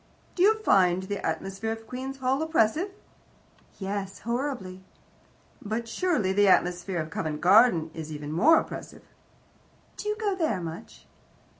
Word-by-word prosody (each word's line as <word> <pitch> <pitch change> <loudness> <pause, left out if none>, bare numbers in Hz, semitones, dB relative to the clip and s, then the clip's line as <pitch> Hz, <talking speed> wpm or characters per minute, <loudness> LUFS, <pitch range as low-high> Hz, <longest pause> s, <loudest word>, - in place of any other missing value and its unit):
"Do 355 - -3
you 425 +4 +6
find 185 - +3
the 200 +1 -5
atmosphere 195 +3 -3
of 225 0 -6
Queen's 260 +3 -6
Hall 265 +2 0
oppressive?" 320 - +1 0.9
"Yes, 195 -1 -4
horribly." 235 -6 -3 0.8
"But 220 +3 -3
surely 230 - 0
the 205 +1 +4
atmosphere 180 0 +2
of 155 0 -4
Covent 155 -2 -3
Garden 180 -4 +5
is 160 -1 -7
even 150 -1 -6
more 315 - +5
oppressive." - - -8 0.9
"Do 420 - -4
you 425 - 0
go 420 -3 0
there 320 - 0
much?" 165 -1 -8
205 Hz, 140 wpm, -27 LUFS, 180-270 Hz, 0.9 s, you